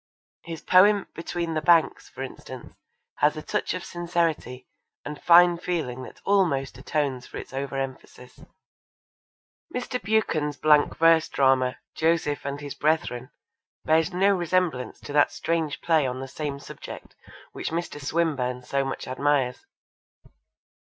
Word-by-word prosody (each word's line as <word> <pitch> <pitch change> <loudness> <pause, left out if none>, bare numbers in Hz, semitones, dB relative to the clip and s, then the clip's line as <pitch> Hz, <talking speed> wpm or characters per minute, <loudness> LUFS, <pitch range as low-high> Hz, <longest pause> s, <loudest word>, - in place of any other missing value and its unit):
His 165 -2 -7
poem 200 +2 +5
Between 170 0 -4
the 155 - -1
Banks, 170 -1 +3
for - - -7
instance, - - -9 0.4
has 150 +1 +2
a 155 - -6
touch - - -2
of 180 - -6
sincerity 165 -7 -2 0.4
and 150 0 -7
fine 175 0 +6
feeling 160 -9 -3
that 130 - -11
almost 140 -11 +1
atones 135 -3 -2
for - - -9
its - - -9
over 135 0 -4
emphasis. 130 -1 -8 1.3
Mr. 250 -1 -3
Buchan's 155 -9 0
blank 150 -1 +4
verse 165 -1 +5
drama 130 -2 +2 0.2
Joseph 160 -3 0
and 140 +1 -4
His 145 -1 -6
Brethren 150 -5 -1 0.6
bears 160 +3 +3
no 195 +2 +3
resemblance 175 -7 -1
to 145 - -8
that 145 0 +4
strange 165 -3 -2
play 160 -5 +2
on 125 0 -4
the 135 - -6
same 145 +1 -4
subject - - -10 0.4
which - - -4
Mr. 165 -3 -4
Swinburne 135 -6 -1
so 135 +2 -1
much 135 0 -5
admires. 130 -1 0
155 Hz, 140 wpm, -25 LUFS, 135-170 Hz, 1.3 s, fine